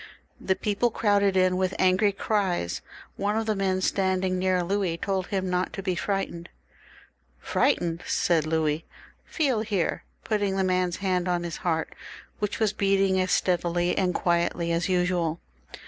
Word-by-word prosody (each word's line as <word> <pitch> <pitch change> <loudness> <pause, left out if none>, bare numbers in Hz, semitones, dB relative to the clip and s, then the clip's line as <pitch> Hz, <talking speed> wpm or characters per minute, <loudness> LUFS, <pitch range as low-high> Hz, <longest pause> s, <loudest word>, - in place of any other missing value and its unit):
The 190 - 0
people 210 +4 0
crowded 200 -3 +2
in 185 0 +3
with 185 0 0
angry 185 +3 +3
cries. 195 - -1 0.4
One 205 +2 0
of 225 - -1
the 215 -1 0
men 190 -1 0
standing 185 -1 0
near 185 -1 +1
Louis 190 -2 -1
told 190 0 -2
him 190 -2 -2
not 180 0 -1
to 195 - -5
be 185 -1 0
frightened. 175 -2 -3 0.5
" - - -32
Frightened! 175 -11 +1
" - - -10 0.2
said 160 -3 +2
Louis, 155 0 0 0.4
"feel 275 -8 0
here!" 205 -6 -1 0.2
putting 205 -3 0
the 190 - +2
man's 185 -1 +1
hand 180 -1 +1
on 175 -1 0
his 170 -1 -4
heart, 160 -2 -1 0.5
which 210 -1 -2
was 215 -2 +2
beating 195 -2 +2
as 185 - -1
steadily 175 -1 +1
and 180 -2 0
quietly 170 -1 0
as 170 +2 0
usual. 180 -3 +1
185 Hz, 165 wpm, -26 LUFS, 175-195 Hz, 0.5 s, in